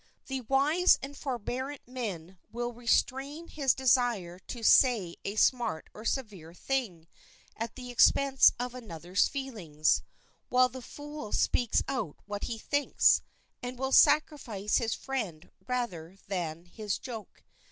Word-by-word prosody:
The 265 -1 -3
wise 285 +9 +4
and 280 +1 -6
forbearant 260 +1 -4
man 190 -8 -6
will 240 +1 -3
restrain 270 +6 0
his 275 -4 +1
desire 240 -9 +1
to 230 +5 -8
say 220 -8 +5
a 200 - -4
smart 225 -8 +1
or 215 - -11
severe 195 - -3
thing 200 -11 -3 0.5
at 230 +1 -5
the 250 -1 -8
expense 270 +2 +5
of 245 0 -3
another's 185 -6 -1
feelings, 190 - -1 0.5
while 255 0 +4
the 260 0 -9
fool 290 -3 -8
speaks 240 -3 +2
out 240 - -3
what 205 0 -4
he 230 - -4
thinks, 285 +5 +3 0.4
and 250 0 -5
will 265 +1 -2
sacrifice 245 -11 +3
his 225 -1 0
friend 210 - -5 0.2
rather 195 -9 -3
than 170 -3 -3
his 205 +2 -4
joke. 230 -5 -9
240 Hz, 130 wpm, -30 LUFS, 195-265 Hz, 0.5 s, say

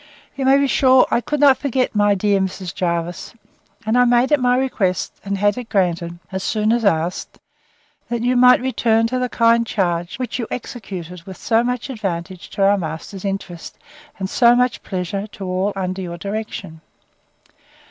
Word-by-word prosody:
You 270 - -2
may 270 +1 +6
be 280 - +2
sure 260 -1 +5
I 235 - +2
could 295 +4 -3
not 275 -3 +5
forget 260 -2 -1
my 205 -1 +3
dear 200 0 +1
Mrs. 190 -1 -3
Jervis; 175 +1 -3 0.5
and 220 +2 +1
I 250 - +5
made 245 +2 +3
it 295 - +4
my 250 0 +2
request, 200 -9 -1
and 200 0 -2
had 205 +4 +1
it 245 - -9
granted, 175 -4 0
as 190 0 -3
soon 215 +2 +1
as 235 -1 0
asked, 175 -3 -1 0.7
that 235 -1 -2
you 250 +1 +2
might 250 0 +6
return 230 -3 +1
to 255 +2 -1
the 250 0 -1
kind 230 0 +3
charge, 175 -6 -2
which 255 -1 -4
you 235 - -3
executed 180 -8 -7
with 190 - -8
so 230 0 +1
much 250 +1 -2
advantage 185 -5 -5
to 200 - -2
our 200 +1 +4
master's 160 +3 -6
interest, 195 -4 -5 0.4
and 190 - -3
so 240 +4 +4
much 250 0 +1
pleasure 195 +2 -4
to 200 - -8
all 185 +2 -1
under 185 0 -3
your 175 -2 -6
direction. 200 -5 -6
205 Hz, 180 wpm, -20 LUFS, 185-245 Hz, 0.7 s, may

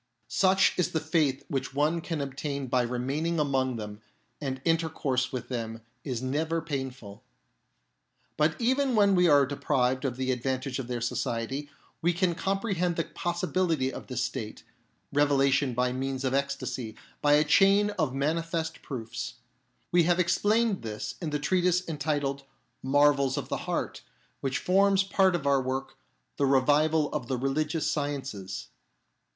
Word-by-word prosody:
Such 190 0 +3
is 180 - +1
the 160 - +2
faith 155 -4 0
which 135 0 -3
one 155 +4 +1
can 165 -3 -3
obtain 140 0 -3
by 125 0 +2
remaining 135 +7 -1
among 135 -3 +1
them, 105 -1 -7 0.4
and 135 -2 -3
intercourse 160 -6 0
with 130 -3 -4
them 115 -2 -4 0.2
is 125 -3 -3
never 160 +5 0
painful. 130 -9 -5 1.1
But 155 +1 +1
even 260 +2 +2
when 200 -2 +5
we 180 -1 +4
are 145 -2 +6
deprived 130 -2 0
of 130 -3 -2
the 130 0 0
ad 125 -2 -2
vantage 130 0 -2
of 130 - -4
their 120 -1 -3
society, 125 +3 -2 0.3
we 175 +1 +2
can 175 0 +1
comprehend 185 0 -1
the 165 - 0
possibility 175 -6 -1
of - - -8
this 125 -1 -2
state 115 -4 -5 0.5
(revelation 140 -2 +3
by 125 +1 +1
means 135 0 -3
of 130 -1 0
ecstasy) 140 -5 -2 0.3
by 145 0 +4
a 150 +1 +6
chain 195 +6 +4
of 155 -9 -1
manifest 160 +4 -2
proofs. 120 -5 -5 0.6
We 175 - +5
have 175 +1 +2
explained 205 +4 +2
this 110 -2 -5
in 165 - -2
the 150 - 0
treatise 180 +4 +1
entitled 145 -3 -1 0.4
Marvels 140 0 +3
of 140 - -4
the - - -1
Heart, - - -2 0.4
which 135 -1 -1
forms 195 +1 +3
part 190 -1 +3
of 160 -5 -3
our 140 -1 +3
work, 130 +1 -3 0.4
The 140 - +2
Revival 145 +3 +3
of 140 -6 -3
the 130 - -1
Religious 150 +5 0
Sciences. 135 -10 -4
145 Hz, 155 wpm, -28 LUFS, 130-165 Hz, 1.1 s, are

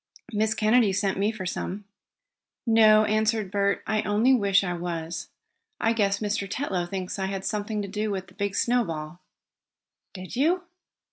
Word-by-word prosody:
"Miss 215 +1 +1
Kennedy 220 0 +4
sent 195 -1 0
me 205 +2 +2
for 215 -4 -6
some." 195 +3 -4 0.8
"No," 215 -2 +6
answered 215 -2 +1
Bert. 200 -1 +1
"I 215 -1 +1
only 220 +6 +3
wish 200 -5 +3
I 175 -2 -2
was. 170 -1 -4 0.5
I 225 - +2
guess 200 -3 +1
Mr. 205 -1 -2
Tetlow 195 -9 -2
thinks 190 0 -4
I 190 - -1
had 195 0 -4
something 210 +1 -2
to - - -5
do 210 +2 -2
with 190 -2 -3
the 180 - -19
big 200 0 -2
snowball." 175 -10 -1 1.0
"Did 185 -1 -7
you?" 335 +8 +2
205 Hz, 160 wpm, -26 LUFS, 190-220 Hz, 1.0 s, No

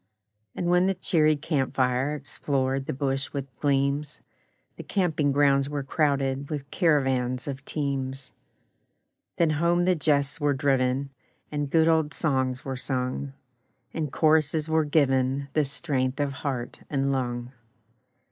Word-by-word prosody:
And - - -3
when 180 +1 +3
the 195 - +1
cheery 155 -4 +3
camp 140 -3 -2
fire 130 +3 +1
Explored 135 0 -2
the - - -1
bush 135 0 -2
with 135 -3 -5
gleams, 140 +1 0 0.6
The - - -8
camping 160 -7 0
grounds 140 -1 +3
were 145 -1 -3
crowded 140 -1 0
With 145 -3 -5
caravans 130 -6 +1
of 135 -1 -5
teams; 135 -3 -3 1.1
Then 165 -2 +3
home 170 +3 +2
the 185 - +4
jests 150 -1 +1
were 145 -1 +2
driven, 135 -1 +1 0.4
And 145 -1 -2
good 160 +2 +4
old 160 -2 +2
songs 130 -4 0
were 135 -1 -3
sung, 130 +1 -2 0.6
And 155 -4 -3
choruses 155 0 +2
were 160 -1 +2
given 140 -2 +1
The 155 - +3
strength 135 -2 -2
of 145 -1 0
heart 130 -3 -4
and 140 -1 0
lung. 120 -2 -2
140 Hz, 140 wpm, -26 LUFS, 135-155 Hz, 1.1 s, the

